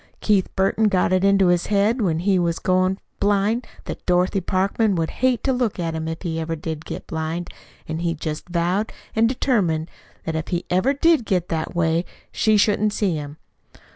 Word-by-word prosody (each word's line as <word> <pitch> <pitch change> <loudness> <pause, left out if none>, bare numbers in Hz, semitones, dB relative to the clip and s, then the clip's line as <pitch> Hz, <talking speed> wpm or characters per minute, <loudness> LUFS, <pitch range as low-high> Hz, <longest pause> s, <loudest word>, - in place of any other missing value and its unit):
Keith 200 -3 +2
Burton 195 +3 +2
got 185 -2 +2
it 185 0 +2
into 195 -2 +4
his 175 -1 +2
head 210 +4 +2
when 170 -6 +1
he 190 0 +2
was 170 -1 +1
first - - -10
goin' 185 +1 +2 0.2
blind 205 +4 +1 0.2
that - - -6
Dorothy 180 +2 +2
Parkman 195 +3 +1
would 165 -2 -1
hate 255 -2 +2
to 265 - +2
look 245 -4 -1
at 165 -2 -2
him 160 0 -3
if 165 +3 -5
ever 165 -1 -2
he 165 - -5
did 160 0 -5
get - - -6
blind; 160 +2 -4 0.4
an' 160 +1 -3
he 170 -1 -1
just 155 +2 -5
vowed 180 +5 0 0.2
an' 225 +1 +4
determined 195 - 0 0.3
that 160 - -2
if 170 +2 -2
ever 185 +10 +3
he - - -12
did 330 -6 +4
get 185 -4 -1
that 160 +1 -3
way, 165 0 +2 0.3
she 215 -1 +3
shouldn't 210 0 +2
see 200 -5 0
him. 145 -1 -6
185 Hz, 200 wpm, -22 LUFS, 165-210 Hz, 0.4 s, into